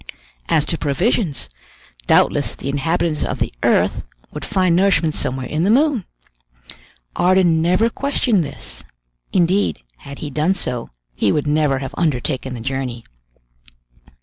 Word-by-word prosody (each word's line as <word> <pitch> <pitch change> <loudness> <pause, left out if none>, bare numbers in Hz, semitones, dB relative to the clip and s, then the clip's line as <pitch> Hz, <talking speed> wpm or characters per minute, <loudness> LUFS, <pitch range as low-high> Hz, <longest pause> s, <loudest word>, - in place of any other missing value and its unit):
As 150 - +3
to 165 - -3
provisions, 165 - 0 0.6
doubtless - - +3
the 140 - -5
inhabitants 155 +2 0
of - - -2
the - - -2
earth - - +2 0.3
would - - -6
find 185 -4 +2
nourishment 180 -4 +3
somewhere 130 -2 -2
in 155 - -2
the 185 - +2
moon. 260 - +3 1.1
Ardan 180 -3 +3
never 180 +7 +3
questioned 240 -6 +1
this; - - -7 0.5
indeed, 185 - +1
had 140 - -10
he 150 - -6
done 155 +7 +1
so, 125 -9 -3 0.2
he - - +1
would 150 - 0
never 150 -2 +2
have 135 0 -5
undertaken 130 -4 -1
the 115 - -7
journey. 125 -2 -4
160 Hz, 135 wpm, -19 LUFS, 135-185 Hz, 1.1 s, As